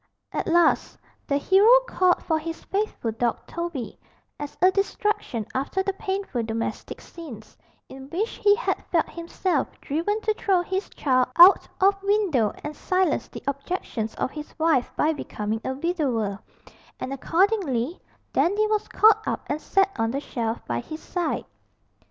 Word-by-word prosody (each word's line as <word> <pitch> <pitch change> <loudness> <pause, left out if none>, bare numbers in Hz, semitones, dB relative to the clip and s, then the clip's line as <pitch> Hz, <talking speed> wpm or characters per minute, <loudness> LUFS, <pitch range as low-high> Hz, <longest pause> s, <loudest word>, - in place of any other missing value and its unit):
At - - -3
last 340 -1 +3 0.3
the 280 - +2
hero 385 +8 +5 0.2
called 365 -5 +2
for 320 -2 +1
his 330 +1 -6
faithful 395 - -2
dog 230 +1 -1
Toby, 335 - -5 0.4
as 290 0 -7
a 370 +1 +5
distraction 395 - -1
after 280 +9 -1
the 390 0 -1
painful 385 - -3
domestic 225 0 -4
scenes, 260 -11 -11 0.3
in 265 +1 -11
which 405 +8 -2
he 410 0 +6
had 485 - -2
felt 335 -2 +1
himself 335 -2 -1
driven 340 +9 -1
to 435 - +1
throw 385 -4 +1
his 380 +3 -3
child 255 -3 +1
out 355 +3 +8
of 390 +1 +3
window 390 - +2
and 300 0 -5
silence 370 -2 0
the - - -10
objections 275 -5 -3
of - - -2
his 300 -1 -9
wife 315 -6 +2
by 315 +1 +2
becoming 220 -6 -4
a 260 - -2
widower, 260 - -1 0.6
and 265 - -4
accordingly 330 - 0 0.3
Dandy 410 +5 +2
was 430 0 0
caught 435 0 +5
up - - -2
and 300 +2 -3
set 390 0 +2
on 225 0 +1
the 270 +4 -2
shelf 235 -5 -4
by 120 -1 -2
his 310 - -7
side. 350 -3 -2
330 Hz, 155 wpm, -25 LUFS, 260-390 Hz, 0.6 s, out